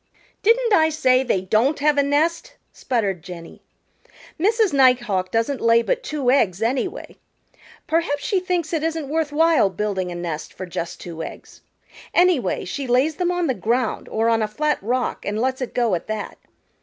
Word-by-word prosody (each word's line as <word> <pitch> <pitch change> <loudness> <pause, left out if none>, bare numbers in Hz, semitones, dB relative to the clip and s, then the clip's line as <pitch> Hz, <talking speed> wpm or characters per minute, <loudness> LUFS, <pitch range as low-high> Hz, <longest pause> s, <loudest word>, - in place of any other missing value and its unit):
"Didn't 465 +1 +3
I 320 -4 +5
say 255 -4 +3
they 235 -8 0
don't 225 +10 +1
have 295 +1 +2
a 285 - +4
nest?" 295 +4 0 0.2
sputtered 205 -9 -2
Jenny. 170 -1 -10 0.8
"Mrs. 425 +1 +2
Nighthawk 240 -9 +3
doesn't 230 +4 -1
lay 230 0 +4
but - - -1
two 290 - -1
eggs, 195 -9 +2
anyway. 250 +3 -2 0.7
Perhaps 320 -3 0
she 390 - +1
thinks 355 -3 -2
it 320 - 0
isn't 320 -3 -2
worth 315 -1 -1
while 320 -7 +3
building 190 -1 -3
a - - -6
nest 170 -3 -5
for 185 - -7
just 170 -1 -5
two 165 -2 -7
eggs. - - -10 0.5
Anyway, 345 - +2
she 275 +8 -4
lays 260 +6 +2
them 360 -1 0
on 355 -1 0
the 265 - +1
ground 235 0 -1
or 225 +1 0
on 225 -1 +2
a 215 - 0
flat 300 +8 -1
rock 245 +5 -2
and 205 +1 -3
lets 260 +2 -1
it 255 - -5
go 235 -4 +1
at 170 - -2
that. 215 -1 -5
255 Hz, 180 wpm, -22 LUFS, 210-315 Hz, 0.8 s, I